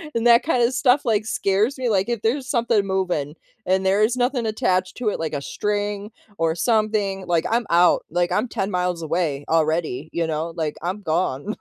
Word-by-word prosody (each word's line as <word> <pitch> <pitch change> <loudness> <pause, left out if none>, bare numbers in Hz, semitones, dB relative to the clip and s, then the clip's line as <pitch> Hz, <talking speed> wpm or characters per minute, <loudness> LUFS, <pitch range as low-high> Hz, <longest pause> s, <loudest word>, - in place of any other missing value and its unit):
And 230 0 0
that 235 0 +6
kind 250 -6 +1
of 245 - 0
stuff, 255 +1 +3
like, 215 -2 +1
scares 215 +4 0
me. 255 -2 -1
Like, 195 0 +1
if 235 -3 -2
there's 255 +4 -1
something 230 -5 +1
moving 180 -6 -1 0.3
and 190 +1 +1
there 195 +2 +3
is 230 +3 +2
nothing 245 -1 0
attached 200 -5 0
to 245 -4 0
it - - -4
like 160 -1 -3
a 145 - -2
string 205 - -3 0.3
or 165 0 +1
something, 210 -2 0
like, 170 -2 +1
I'm 235 +1 +1
out, 175 +1 +4
like, 175 +2 0
I'm 215 - +1
10 195 -3 -3
miles 180 -2 -1
away 160 -3 -1
already, 155 -3 0
you 170 - 0
know, 160 +1 -3
like, 155 -3 -2
I'm 185 +5 -3
gone. 165 +1 -1
195 Hz, 200 wpm, -22 LUFS, 170-225 Hz, 0.3 s, that